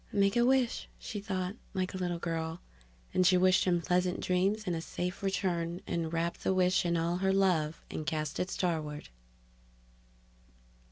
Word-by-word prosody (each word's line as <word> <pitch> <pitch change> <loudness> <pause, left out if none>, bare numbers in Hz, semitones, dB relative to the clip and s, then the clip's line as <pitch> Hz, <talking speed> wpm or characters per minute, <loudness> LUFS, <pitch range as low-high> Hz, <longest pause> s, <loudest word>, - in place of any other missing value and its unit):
Make 200 +1 +2
a 240 - +4
wish! 255 -1 +2
she 210 - -5
thought, 190 0 -3 0.2
like 185 -1 -1
a - - -3
little 175 -2 -1
girl, 165 -1 -3 0.5
and 185 - +4
she 185 0 +5
wished 185 0 +4
him 175 -2 +2
pleasant 180 +1 +1
dreams 195 +4 +1
and 175 - 0
a 165 - -3
safe 180 +2 -4
return 175 -3 -1
and 165 -2 -2
wrapped 170 +1 -2
the 190 - +2
wish 180 -1 +3
in 170 0 +1
all 170 +1 0
her 190 +1 +2
love 175 -5 +1
and 155 - -3
cast 155 0 -2
it 180 - -1
starward. 155 - -2
180 Hz, 170 wpm, -31 LUFS, 165-190 Hz, 0.5 s, she